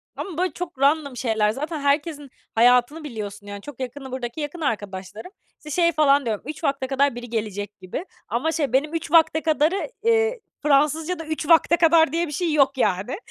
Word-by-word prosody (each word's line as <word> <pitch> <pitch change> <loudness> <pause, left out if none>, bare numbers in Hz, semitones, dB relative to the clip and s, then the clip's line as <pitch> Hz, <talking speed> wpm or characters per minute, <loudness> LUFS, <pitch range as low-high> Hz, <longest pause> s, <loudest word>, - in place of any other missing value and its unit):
ama 350 -5 -6
böyle 365 +1 0
çok 350 -6 -7
random 280 -2 +2
şeyler. 220 -3 +1
Zaten 305 +5 -4
herkesin 290 0 -1 0.3
hayatını 245 +6 +4
biliyorsun, 205 -6 -7
yani. 205 0 -7
Çok 280 +2 -11
yakını 265 +1 -6
buradaki 255 +2 -5
yakın 295 +4 -5
arkadaşlarım. 205 - -4 0.3
İşte, 300 - -11
şey 335 - +4
falan 285 -3 +3
diyorum, 220 -3 -2
"3 305 +3 -7
vakte 275 -3 0
kadar 275 -1 +1
biri 245 -1 -8
gelecek 210 -2 -4
gibi." 185 - -6 0.2
Ama 285 +8 -1
şey, 290 -7 -1
benim 300 +4 +1
3 325 - -4
vakte 320 -1 +5
kadarı, 315 - +1
eee, 455 +1 +2 0.2
Fransızca'da 305 +4 +1
3 310 -1 -4
vakte 335 +1 +5
kadar 325 -3 +5
diye 335 +2 0
bir 295 - -7
şey 330 +2 -1
yok, 275 -2 +3
yani. 205 - 0
285 Hz, 185 wpm, -23 LUFS, 240-320 Hz, 0.3 s, vakte